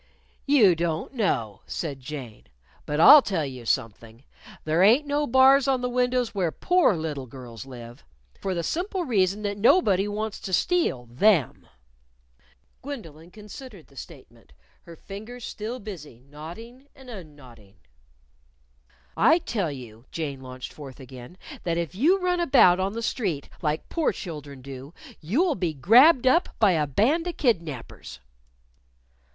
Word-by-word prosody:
"You 240 -10 +5
don't 165 - -3
know," 120 - -1
said 145 -5 -5
Jane. 130 -5 -9 0.4
"But 150 0 -2
I'll 285 - +10
tell 180 - -2
you 130 -4 -8
something: 115 0 -3 0.4
There 155 +3 +1
ain't 235 +10 +5
no 290 +1 -1
bars 265 +2 +5
on 265 -2 +1
the 250 - -2
windows 250 -1 0
where 185 -5 -1
poor 355 - +2
little 150 -5 -5
girls 120 -1 -10
live. 120 -1 -11 0.4
For 190 -1 -3
the 170 - -2
simple 360 - -2
reason 200 - 0
that 205 0 -3
nobody 205 - +3
wants 210 0 -4
to 190 - -7
steal 330 - +1
them." 145 - +1 1.1
Gwendolyn 170 - -9
considered 210 - -12
the 140 - -23
statement, 120 - -13 0.3
her 170 - -11
fingers 220 +8 -9
still 225 +4 -6
busy 170 - -10
knotting 170 - -12
and 265 -1 -16
unknotting. 145 - -13 1.4
"I 315 +10 +5
tell 205 - -3
you," 120 -4 -11
Jane 145 -5 -5
launched 130 0 -9
forth 140 -3 -11
again, 130 +4 -12 0.3
"that 170 -1 -1
if 170 0 -3
you 320 - +3
run 360 -1 0
about 260 - +5
on 190 +2 -1
the 230 +1 -5
street, 185 - -3
like 150 -1 -2
poor 330 -2 0
children 145 -7 -9
do, 135 +3 -10 0.2
you'll 290 - +1
be 175 - -3
grabbed 245 - +6
up 330 +8 +3
by 210 -4 +4
a 155 -4 0
band 275 - +1
of 350 - -5
kidnapers." 165 - -3
180 Hz, 145 wpm, -25 LUFS, -, 1.4 s, I'll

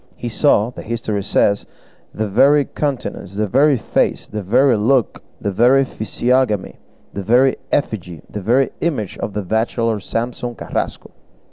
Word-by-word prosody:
He 120 - -4
saw, 115 -2 +2
the - - -9
history 110 -3 -3
says, 100 +1 +1 0.4
the 110 0 -3
very 135 +7 +4
countenance, 130 -9 -4
the 105 +1 0
very 135 +6 +3
face, - - 0
the 105 - -5
very 125 +6 +3
look, 120 +3 +1 0.2
the 100 - -2
very 125 +7 +4
physiognomy, 120 -2 -1 0.3
the 100 - -4
very 125 +6 +3
effigy, 90 - -2
the 105 - -6
very 125 +7 +2
image 135 - -2
of 105 - -4
the 105 - -3
bachelor 110 +2 0
Samson 120 +4 -4
Carrasco! - - -4
115 Hz, 145 wpm, -19 LUFS, 105-130 Hz, 0.4 s, very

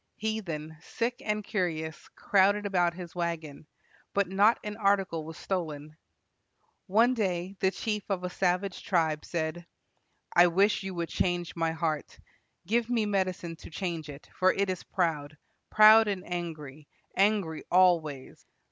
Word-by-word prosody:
Heathen, 170 -8 -4
sick 240 +6 -3
and 210 0 -1
curious, 165 -6 -3
crowded 205 +1 +3
about 175 -3 +1
his 175 -2 -8
wagon, 165 -4 -4 0.5
but 200 -1 +2
not 200 +5 +4
an 210 0 -5
article 195 -6 +1
was 160 0 -9
stolen. 155 -5 -4 0.9
One 225 +6 +4
day 190 -4 -2
the 190 - +3
chief 210 +1 -4
of 190 -2 -1
a 180 - -2
savage 185 +1 -1
tribe 160 -5 +1
said: 170 +1 -4 0.7
"I 175 +1 +8
wish 195 +5 +2
you 190 -1 -5
would 170 -1 -3
change 175 -1 -1
my 165 -1 0
heart. 160 -2 -3 0.5
Give 230 +5 0
me 230 -3 +1
medicine 185 -4 -1
to - - -12
change 165 -2 -4
it; 145 0 -10
for 185 0 +3
it 200 -1 0
is 185 - -5
proud, 155 -5 -2 0.3
proud 215 +1 +7
and 195 -3 -2
angry, 155 -5 -6 0.3
angry 195 -6 +1
always." 170 -7 +2
180 Hz, 145 wpm, -29 LUFS, 160-200 Hz, 0.9 s, I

